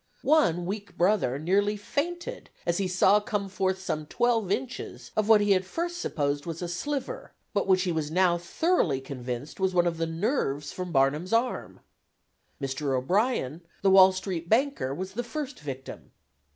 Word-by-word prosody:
One 175 Hz, -, +3 dB
'weak 200 Hz, +1 st, -5 dB
brother' 180 Hz, -8 st, +2 dB
nearly 200 Hz, +7 st, +1 dB
fainted 340 Hz, +11 st, -4 dB, 0.2 s
as 170 Hz, +1 st, +1 dB
he 195 Hz, -, 0 dB
saw 190 Hz, +3 st, +4 dB
come 205 Hz, -1 st, -2 dB
forth 190 Hz, -1 st, 0 dB
some 155 Hz, -5 st, -3 dB
twelve 230 Hz, -3 st, +1 dB
inches 245 Hz, +4 st, -4 dB
of 215 Hz, -1 st, +1 dB
what 215 Hz, -2 st, +7 dB
he 205 Hz, -1 st, +4 dB
at 185 Hz, -1 st, +1 dB
first 345 Hz, -, -3 dB
supposed 145 Hz, 0 st, -1 dB
was 165 Hz, +1 st, -4 dB
a -, -, -2 dB
'sliver,' 290 Hz, -, -4 dB, 0.2 s
but 200 Hz, -, 0 dB
which 185 Hz, -1 st, +4 dB
he 180 Hz, -, 0 dB
was 160 Hz, -2 st, -2 dB
now 175 Hz, +1 st, +3 dB
thoroughly 175 Hz, -, +1 dB
convinced 130 Hz, +2 st, -6 dB
was 190 Hz, -1 st, +1 dB
one 175 Hz, 0 st, +4 dB
of 170 Hz, -1 st, 0 dB
the 165 Hz, -, 0 dB
nerves 165 Hz, -, -1 dB
from 180 Hz, -1 st, -5 dB
Barnum's 150 Hz, +7 st, +1 dB
arm. 235 Hz, +2 st, -1 dB, 0.8 s
Mr. 135 Hz, 0 st, -1 dB
O'Brien, 175 Hz, -, 0 dB, 0.2 s
the 195 Hz, -, +5 dB
Wall 190 Hz, 0 st, +8 dB
Street 185 Hz, -3 st, -4 dB
banker, 250 Hz, -, +2 dB
was 185 Hz, +7 st, -5 dB
the 240 Hz, +4 st, -2 dB
first 275 Hz, +4 st, -5 dB
victim. 135 Hz, -3 st, -8 dB
185 Hz, 170 wpm, -27 LUFS, 155-215 Hz, 0.8 s, Wall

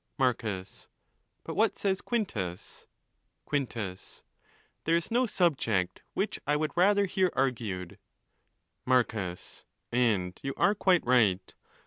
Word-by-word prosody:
Marcus.—But 110 Hz, -8 st, -4 dB
what -, -, +2 dB
says 195 Hz, -1 st, 0 dB
Quintus? 105 Hz, -, -4 dB, 0.6 s
Quintus.—There 120 Hz, -, -5 dB
is 170 Hz, +4 st, -1 dB
no 245 Hz, +2 st, +3 dB
subject 115 Hz, -, +1 dB
which 200 Hz, -, -1 dB
I 150 Hz, -, +3 dB
would 155 Hz, +1 st, 0 dB
rather 200 Hz, +3 st, +4 dB
hear 190 Hz, -1 st, +1 dB
argued..., 110 Hz, -9 st, -2 dB, 0.8 s
Marcus.—And 110 Hz, -2 st, -1 dB
you 135 Hz, 0 st, -4 dB
are 205 Hz, -, +4 dB
quite 190 Hz, -4 st, +2 dB
right. 105 Hz, -7 st, +3 dB
125 Hz, 95 wpm, -29 LUFS, -, 0.8 s, rather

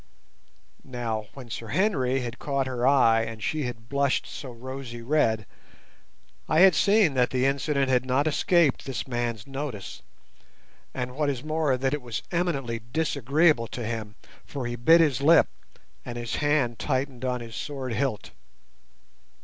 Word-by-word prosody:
Now 115 Hz, -4 st, -4 dB
when 125 Hz, -4 st, -10 dB
Sir 115 Hz, -, -5 dB
Henry 135 Hz, -, +1 dB
had 120 Hz, 0 st, -6 dB
caught 140 Hz, -2 st, -1 dB
her 125 Hz, -1 st, -1 dB
eye 115 Hz, -5 st, +5 dB
and 110 Hz, -1 st, -6 dB
she 155 Hz, +3 st, -1 dB
had 115 Hz, -2 st, -7 dB
blushed 140 Hz, 0 st, +1 dB
so 135 Hz, -, -8 dB
rosy 125 Hz, -1 st, -8 dB
red, 115 Hz, -6 st, +1 dB, 1.0 s
I 155 Hz, +2 st, +4 dB
had 190 Hz, -1 st, +8 dB
seen 200 Hz, -3 st, +4 dB
that 125 Hz, -2 st, +2 dB
the 130 Hz, 0 st, 0 dB
incident 140 Hz, 0 st, +1 dB
had 125 Hz, -1 st, +3 dB
not 130 Hz, +3 st, +1 dB
escaped 155 Hz, -1 st, +2 dB
this 130 Hz, -4 st, -4 dB
man's 120 Hz, -4 st, -3 dB
notice, 135 Hz, -7 st, -6 dB, 0.9 s
and, 125 Hz, -1 st, -5 dB
what 150 Hz, 0 st, 0 dB
is 135 Hz, -2 st, -3 dB
more, 155 Hz, -3 st, 0 dB
that 135 Hz, +2 st, 0 dB
it 150 Hz, -, -2 dB
was 120 Hz, -4 st, -5 dB
eminently 140 Hz, -10 st, -1 dB
disagreeable 150 Hz, -3 st, +2 dB
to 120 Hz, 0 st, -6 dB
him, 110 Hz, -2 st, -5 dB, 0.3 s
for 135 Hz, -4 st, -6 dB
he 120 Hz, 0 st, -3 dB
bit 165 Hz, +8 st, +6 dB
his 140 Hz, -6 st, +2 dB
lip 160 Hz, +3 st, +6 dB, 0.6 s
and 120 Hz, -, -6 dB
his 120 Hz, -1 st, -3 dB
hand 145 Hz, -6 st, +1 dB
tightened 130 Hz, -2 st, -2 dB
on 125 Hz, -1 st, -1 dB
his 115 Hz, -2 st, -9 dB
sword 135 Hz, -4 st, -4 dB
hilt. 130 Hz, -4 st, -2 dB
130 Hz, 155 wpm, -26 LUFS, 120-145 Hz, 1.0 s, had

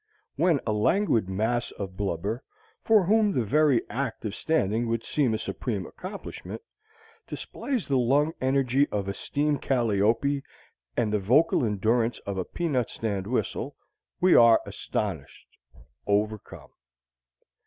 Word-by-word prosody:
When 170 Hz, -5 st, +3 dB
a 110 Hz, -, 0 dB
languid 110 Hz, -, +2 dB
mass 110 Hz, +5 st, 0 dB
of 95 Hz, -2 st, -7 dB
blubber, 100 Hz, +4 st, -2 dB, 0.4 s
for 220 Hz, -3 st, +5 dB
whom 210 Hz, +3 st, +3 dB
the 125 Hz, -, +1 dB
very 140 Hz, +1 st, +3 dB
act 125 Hz, -2 st, -4 dB
of 105 Hz, -, -3 dB
standing 115 Hz, -6 st, 0 dB
would 115 Hz, 0 st, -1 dB
seem 130 Hz, -7 st, +1 dB
a -, -, -1 dB
supreme 110 Hz, -3 st, -4 dB
accomplishment, 200 Hz, -, -8 dB, 0.6 s
displays 250 Hz, -, -4 dB
the 135 Hz, -2 st, +2 dB
lung 145 Hz, +6 st, +2 dB
energy 135 Hz, +1 st, +2 dB
of 100 Hz, -2 st, -2 dB
a 100 Hz, -, -2 dB
steam 145 Hz, +7 st, -1 dB
calliope 120 Hz, +3 st, +1 dB, 0.6 s
and 105 Hz, -1 st, +1 dB
the 105 Hz, -, +2 dB
vocal 135 Hz, +10 st, +3 dB
endurance 115 Hz, +2 st, +1 dB
of 100 Hz, -1 st, -3 dB
a 90 Hz, -, -2 dB
peanut 145 Hz, -9 st, -1 dB
stand 100 Hz, -4 st, -3 dB
whistle 125 Hz, -, -2 dB, 0.4 s
we 185 Hz, 0 st, +5 dB
are 115 Hz, -1 st, +7 dB
astonished, 90 Hz, -10 st, -4 dB, 0.6 s
overcome. 105 Hz, +1 st, -2 dB
120 Hz, 130 wpm, -27 LUFS, 105-145 Hz, 0.6 s, are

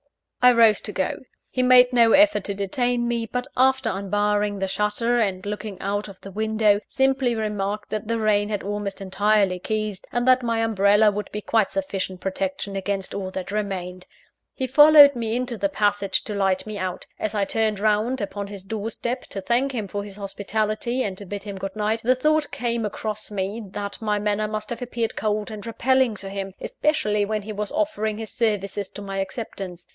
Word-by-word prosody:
I 250 Hz, -, +9 dB
rose 230 Hz, -3 st, +5 dB
to 210 Hz, -, -5 dB
go. 190 Hz, -2 st, -2 dB, 0.3 s
He 255 Hz, -, 0 dB
made 250 Hz, 0 st, +6 dB
no 230 Hz, -2 st, +5 dB
effort 300 Hz, -8 st, +5 dB
to 200 Hz, -, -3 dB
detain 240 Hz, +5 st, 0 dB
me; 235 Hz, -1 st, -1 dB
but, 250 Hz, +3 st, -3 dB
after 260 Hz, -2 st, +3 dB
unbarring 205 Hz, +1 st, 0 dB
the 195 Hz, 0 st, -1 dB
shutter 210 Hz, +5 st, 0 dB
and 195 Hz, -4 st, -1 dB
looking 210 Hz, -1 st, -5 dB
out 205 Hz, +2 st, -2 dB
of 195 Hz, -2 st, -12 dB
the 195 Hz, -, -9 dB
window, 215 Hz, 0 st, +2 dB
simply 265 Hz, -2 st, +2 dB
remarked 210 Hz, -1 st, -3 dB
that 215 Hz, 0 st, -3 dB
the 230 Hz, 0 st, 0 dB
rain 210 Hz, -1 st, +2 dB
had 205 Hz, -2 st, -2 dB
almost 205 Hz, 0 st, -4 dB
entirely 195 Hz, -1 st, +1 dB
ceased, 215 Hz, -3 st, -3 dB
and 240 Hz, +1 st, -1 dB
that 255 Hz, 0 st, +6 dB
my 230 Hz, -2 st, 0 dB
umbrella 210 Hz, 0 st, +4 dB
would 210 Hz, +1 st, -5 dB
be 210 Hz, -, -4 dB
quite 215 Hz, -1 st, +2 dB
sufficient 190 Hz, -1 st, -3 dB
protection 195 Hz, +1 st, -3 dB
against 195 Hz, 0 st, -3 dB
all 190 Hz, -2 st, -3 dB
that 185 Hz, 0 st, -5 dB
remained. 185 Hz, -3 st, -4 dB, 0.5 s
He 260 Hz, -, -1 dB
followed 290 Hz, +1 st, +8 dB
me 230 Hz, -1 st, -2 dB
into 245 Hz, -1 st, -2 dB
the 300 Hz, -, 0 dB
passage 205 Hz, -6 st, +1 dB
to 210 Hz, -, -5 dB
light 195 Hz, -2 st, +1 dB
me 215 Hz, -1 st, -5 dB
out. 185 Hz, -1 st, -4 dB
As 215 Hz, 0 st, -2 dB
I 200 Hz, -1 st, +1 dB
turned 215 Hz, 0 st, 0 dB
round 215 Hz, +5 st, +1 dB
upon 200 Hz, -1 st, -4 dB
his 200 Hz, -2 st, -8 dB
door 215 Hz, +2 st, -4 dB
step 245 Hz, +2 st, -3 dB
to 195 Hz, -, -6 dB
thank 245 Hz, +7 st, +1 dB
him 220 Hz, -5 st, -3 dB
for 200 Hz, +2 st, -4 dB
his 200 Hz, -1 st, -9 dB
hospitality, 215 Hz, +4 st, -2 dB
and 195 Hz, -2 st, -3 dB
to 200 Hz, -, -8 dB
bid 200 Hz, +1 st, -5 dB
him 200 Hz, -2 st, -7 dB
good 195 Hz, +1 st, -5 dB
night, 215 Hz, +1 st, 0 dB
the 255 Hz, +3 st, +3 dB
thought 305 Hz, +3 st, +1 dB
came 235 Hz, -1 st, -2 dB
across 215 Hz, 0 st, -3 dB
me, 205 Hz, +2 st, -3 dB
that 200 Hz, 0 st, -5 dB
my 210 Hz, -1 st, 0 dB
manner 210 Hz, +1 st, 0 dB
must 215 Hz, +1 st, -5 dB
have 240 Hz, -, -4 dB
appeared 235 Hz, -2 st, -2 dB
cold 215 Hz, 0 st, -1 dB
and 210 Hz, -2 st, -7 dB
repelling 260 Hz, 0 st, +2 dB
to 195 Hz, -1 st, -6 dB
him 195 Hz, -1 st, -5 dB
especially 250 Hz, -9 st, 0 dB
when 215 Hz, 0 st, -2 dB
he 215 Hz, +1 st, -6 dB
was 210 Hz, 0 st, -3 dB
offering 295 Hz, -9 st, -1 dB
his 220 Hz, -1 st, -6 dB
services 205 Hz, -3 st, -1 dB
to 205 Hz, -, -9 dB
my 195 Hz, -1 st, -5 dB
acceptance. 190 Hz, -3 st, -5 dB
210 Hz, 200 wpm, -24 LUFS, 200-235 Hz, 0.5 s, I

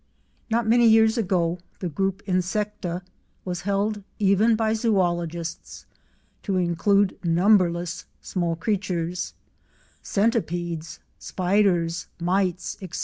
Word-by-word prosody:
Not 230 Hz, 0 st, +1 dB
many 235 Hz, +1 st, +5 dB
years 220 Hz, 0 st, +5 dB
ago 180 Hz, -6 st, 0 dB, 0.2 s
the 180 Hz, -, -3 dB
group 195 Hz, +5 st, -2 dB
Insecta 185 Hz, -1 st, -2 dB, 0.4 s
was 180 Hz, -2 st, -3 dB
held 205 Hz, +2 st, -1 dB, 0.2 s
even 210 Hz, +3 st, +4 dB
by 220 Hz, 0 st, +1 dB
Zoologists 175 Hz, -7 st, -1 dB, 0.6 s
to 195 Hz, -2 st, -1 dB
include 185 Hz, +3 st, +2 dB
numberless 175 Hz, -1 st, +2 dB
small 175 Hz, -3 st, -2 dB
creatures—centipedes, 175 Hz, -1 st, -3 dB, 0.2 s
spiders, 180 Hz, -3 st, +1 dB
mites, 180 Hz, 0 st, 0 dB
etc. 185 Hz, -3 st, -6 dB
185 Hz, 90 wpm, -24 LUFS, 175-210 Hz, 0.6 s, many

